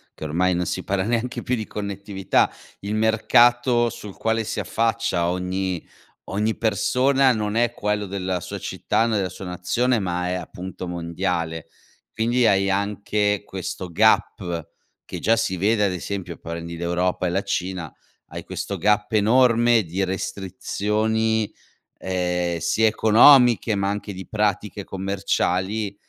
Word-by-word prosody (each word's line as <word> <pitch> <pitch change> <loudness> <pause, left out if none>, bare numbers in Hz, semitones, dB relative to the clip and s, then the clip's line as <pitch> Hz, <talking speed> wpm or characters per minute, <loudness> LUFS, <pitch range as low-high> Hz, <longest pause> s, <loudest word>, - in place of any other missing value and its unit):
che - - -10
ormai 90 +4 +1
non 90 0 -1
si - - -3
para 95 -1 -1
neanche 120 +3 -2
più 125 - -2
di 110 -3 -5
connettività, 100 -1 -1 0.3
il 100 +2 -3
mercato 120 +2 +3
sul 105 -3 -10
quale 115 0 0
si 110 - -4
affaccia 115 -6 0
ogni 90 0 -2 0.4
ogni 105 +3 0
persona 130 +5 +2
non 105 -2 -2
è 120 0 +2
quello 105 -2 -2
della 95 -1 -2
sua - - -6
città, 115 - -1
né 105 -5 0
sua 90 +2 -9
nazione, 110 +8 0
ma 90 -2 -2
è, - - -1
appunto, 90 +1 -6
mondiale. 85 -1 -3 0.4
Quindi 120 +2 +1
hai 100 -1 +3
anche 105 +1 0
questo 95 -2 -6
gap, 85 -4 +1 0.4
che - - -6
già 115 - +3
si 115 -4 0
vede, 105 +4 +2
ad 100 - +1
esempio, 90 -1 -5
prendi 85 0 -6
l'Europa 90 +2 -1
e - - 0
la 95 +3 -1
Cina, 90 -3 -3 0.4
hai - - -7
questo - - -5
gap 105 +1 +1
enorme 115 +1 +4
di 90 +3 -2
restrizioni, 105 +4 -1 0.5
ehm, 90 -2 -1
sia 110 +6 +2
economiche 115 +1 +6
ma 100 0 0
anche 100 0 -4
di 95 0 -9
pratiche 105 -1 -1
commerciali, 95 +1 -1
100 Hz, 140 wpm, -23 LUFS, 90-110 Hz, 0.5 s, economiche